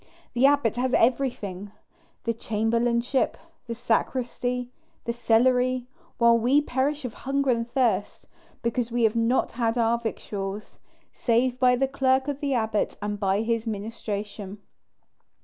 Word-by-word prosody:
The 250 +3 +5
abbot 280 -6 +2
has 255 +1 +1
everything, 225 -6 0 0.5
the 230 - 0
chamberlainship, 235 +3 0 0.3
the 230 - -4
sacristy, 245 +1 -1 0.3
the 235 - -1
cellary; 250 +2 +2 0.3
while 235 -1 +5
we 255 +5 +4
perish 285 +1 -1
of 240 - -4
hunger 275 0 0
and 230 0 -1
thirst, 235 -6 0 0.4
because 235 0 -1
we 240 0 +1
have 220 0 +3
not 230 +1 +1
our 230 0 +2
victuals, 205 -3 -5 0.3
save 245 +1 +1
by 250 -1 +5
the 270 +2 +1
clerk 265 0 +1
of 285 -1 -3
the 280 -3 0
abbot 220 -2 0
and 205 0 -3
by 195 0 +1
his 230 0 -1
ministration. 205 -1 -5
235 Hz, 130 wpm, -26 LUFS, 225-255 Hz, 0.5 s, The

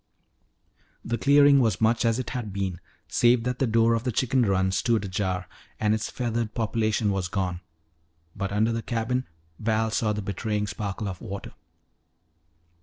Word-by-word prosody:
The 115 0 -2
clearing 140 0 +6
was 110 -7 +2
much 115 +1 +2
as 115 0 +2
it 130 - -4
had 120 -6 -4
been, 95 -3 -3 0.3
save 120 -1 +3
that 125 0 -2
the 135 - +2
door 115 +1 +3
of 115 0 0
the 125 - -1
chicken 130 +3 +1
run 95 -4 +2
stood 110 +2 +1
ajar 95 -1 -2 0.3
and 105 -1 +2
its 110 0 -2
feathered 115 -2 -2
population 110 -1 0
was 95 -2 -1
gone. 90 -2 -2 0.7
But 100 -1 -3
under 110 +3 +2
the 115 0 -2
cabin 120 +3 -2 0.3
Val 110 0 0
saw 110 -1 +1
the 105 -1 -3
betraying 105 +1 -2
sparkle 105 +1 -4
of 95 -2 -6
water. 100 +1 -7
110 Hz, 165 wpm, -26 LUFS, 100-115 Hz, 0.7 s, clearing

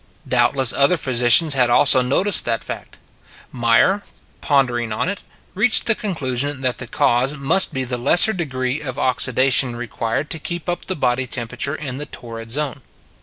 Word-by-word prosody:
Doubtless 135 -3 +1
other 140 +6 +2
physicians 130 +3 +4
had 125 -3 +1
also 130 +2 +6
noticed 180 +11 +2
that - - -2
fact. - - -9 0.5
Meyer, 120 - +1 0.4
pondering 125 -5 0
on 110 - -2
it, 200 +1 -4 0.3
reached 220 +4 +1
the 230 - +3
conclusion 145 - -3
that 130 -2 -2
the 125 - -6
cause 125 +5 0
must 155 +8 +4
be 130 - -3
the 125 -1 -5
lesser 175 - +4
degree 135 -5 -4
of 135 -3 -7
oxidation 130 -1 +1
required 120 +3 -4
to 160 - -4
keep 175 +2 -7
up 175 0 -4
the 190 - -4
body 130 -2 -1
temperature 125 +4 -4
in 140 -4 -7
the 150 +1 -6
torrid 115 -3 -10
zone. 140 +1 -2
130 Hz, 165 wpm, -19 LUFS, 125-150 Hz, 0.5 s, also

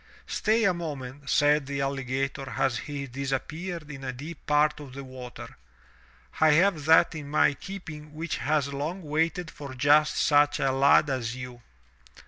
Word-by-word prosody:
"Stay 225 +2 +1
a 195 -4 +4
moment," 145 -5 -6
said 145 -1 +3
the 140 0 -3
alligator 135 0 -2
as 125 -5 +1
he 145 +2 -5
disappeared 150 +5 -4
in 135 -1 -9
a 130 - -3
deep 145 +5 -9
part 150 0 +3
of 140 -3 -10
the 140 +1 -7
water. 130 -2 -10 0.8
"I 155 -1 +6
have 170 -2 +3
that 160 +2 +5
in 150 -3 -7
my 150 -1 +3
keeping 155 -2 -9
which 165 +2 -3
has 145 -1 0
long 160 +7 -4
waited 160 +3 -1
for 140 -3 -9
just 150 +3 +4
such 145 -1 +3
a 135 - +2
lad 140 +2 +4
as 120 -3 -2
you." 125 -1 -8
145 Hz, 160 wpm, -27 LUFS, 135-155 Hz, 0.8 s, I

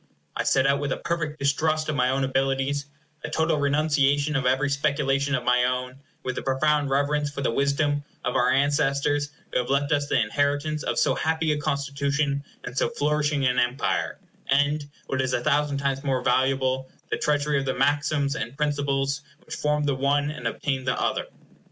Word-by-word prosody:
I - - -2
set 135 0 +3
out 140 0 +3
with 145 -1 -2
a - - -4
perfect 165 -3 -3
distrust 155 +2 +1
of 155 - -1
my 125 -1 +2
own 135 +1 +1
abilities, 135 +1 0 0.4
a - - -4
total 160 -1 +1
renunciation 145 0 +2
of 135 -1 +1
every 130 +3 +2
speculation 140 -1 +1
of 125 - -2
my 125 0 +3
own, 125 0 -1
and 130 - -19 0.2
with 130 -1 -3
a - - -6
profound 145 +2 +1
reverence 145 +2 +1
for 140 -1 -6
the 130 - +1
wisdom 145 +2 +1 0.2
of 125 - -1
our - - +3
ancestors 145 +1 +1 0.2
who - - +2
have 125 - -3
left 140 +2 +1
us 145 -1 +1
the - - +3
inheritance 145 +6 0
of 120 -4 -2
so - - +3
happy 160 0 0
a 150 - 0
constitution 140 0 -1 0.2
and 125 - -7
so - - +1
flourishing 150 - 0
an 125 -1 +2
empire, 125 +2 0 0.3
and, 145 +2 +2 0.2
what 135 -1 -1
is 130 -1 -1
a 120 - 0
thousand 145 0 +1
times 140 0 -1
more 130 -3 0
valuable, 130 +1 +1 0.2
the - - +1
treasury 150 -1 +1
of 135 - -3
the 130 - -1
maxims 145 +1 +1
and 135 -4 -5
principles 140 -1 0 0.2
which - - -8
formed 150 0 0
the 140 - +1
one 145 +2 +1
and 150 - -4
obtained 135 -3 -2
the 125 - 0
other. - - -1
140 Hz, 195 wpm, -25 LUFS, 135-150 Hz, 0.4 s, set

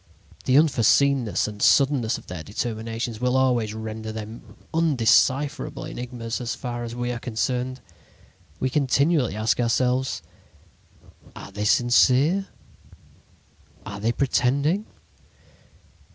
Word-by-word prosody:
The 130 +1 +4
unforeseenness 140 -5 +3
and 105 -1 -8
suddenness 135 -5 +3
of - - -14
their 90 -2 -7
determinations 115 +3 -4
will 125 +1 +2
always 120 -5 +1
render 110 0 -6
them 110 +1 -9 0.2
undecipherable 135 - +2
enigmas 120 -1 -5
as 120 - -3
far 120 -2 -5
as 120 0 -6
we 120 0 -2
are 120 - -4
concerned. 125 +2 -2 0.8
We 130 - -1
continually 140 - +2
ask 110 +3 0
ourselves: 125 +2 0 1.1
"'Are - - -10
they 105 0 -4
sincere? 130 - +3 1.4
Are 100 0 -7
they 110 +3 +1
pretending?' 140 - +1
125 Hz, 110 wpm, -24 LUFS, 110-135 Hz, 1.4 s, The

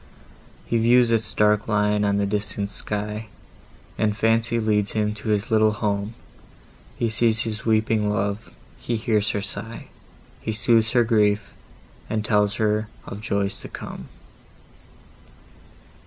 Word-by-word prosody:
He 115 - 0
views 120 +1 +4
its 115 -1 +2
dark 105 0 +2
line 105 -1 +1
on 100 -1 +1
the 100 - +1
distant 100 0 -1
sky, 105 +1 -2 0.7
And 105 -1 +1
Fancy 115 +2 +2
leads 105 -2 0
him 105 -1 0
to 110 - -9
his 105 +1 0
little 110 -1 +4
home, 105 0 -2 0.8
He 120 - 0
sees 115 0 +2
his 110 -1 -4
weeping 110 -1 +2
love, 100 0 -2 0.3
he 120 - -2
hears 110 -2 0
her 105 - -2
sigh, 115 +3 -3 0.5
He 110 - -3
sooths 110 0 +3
her 120 -2 +5
griefs, 105 -3 +1 0.6
and 110 -1 -2
tells 105 -2 +1
of 105 -1 -2
joys 100 -2 -2
to - - -9
come. - - -9
105 Hz, 135 wpm, -23 LUFS, 105-110 Hz, 0.8 s, her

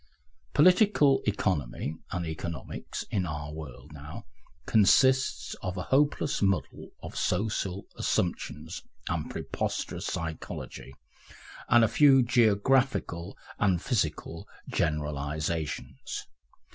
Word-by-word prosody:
Political 180 -4 +5
economy 80 -9 -1 0.2
and 90 -2 -2
economics, 80 +1 -5
in 95 -3 0
our 75 -1 -5
world 75 -5 -9
now, - - -9 0.4
consist 130 +5 +4
of 90 0 -4
a 90 - -2
hopeless 145 0 +2
muddle 95 -2 0
of - - -8
social 100 0 -1
assumptions 90 - -2 0.3
and - - -2
preposterous - - -3
psychology, 80 -4 -5 0.7
and 120 -1 +6
a - - +5
few 135 +1 +6
geographical 120 -5 +2 0.2
and 95 -4 +3
physical 85 - -2 0.2
generalisations. 75 +1 -2
95 Hz, 95 wpm, -29 LUFS, 80-125 Hz, 0.7 s, and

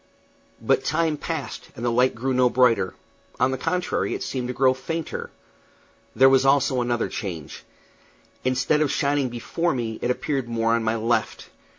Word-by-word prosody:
But - - +1
time 160 -1 +1
passed, 145 -4 -5
and 120 - -5
the 120 - +2
light 125 +2 +2
grew 130 +3 -1
no 125 0 +4
brighter; 120 -7 +2 0.4
on 130 +1 +3
the 130 - -2
contrary, 180 +2 -1
it - - -4
seemed 125 -2 -3
to 125 - -3
grow 130 -1 +4
fainter. 160 +5 -5 0.9
There 135 - +7
was 135 0 +5
also 135 -1 +3
another 120 -1 0
change. 85 -8 -6 0.8
Instead 130 +4 +1
of 150 - +2
shining 140 -2 +1
before 135 +7 -2
me, 115 -3 -3
it 120 - -1
appeared 135 -1 -1
more 115 0 +1
on 115 -1 +1
my 110 +1 +1
left. 115 +1 -1
130 Hz, 170 wpm, -24 LUFS, 120-140 Hz, 0.9 s, There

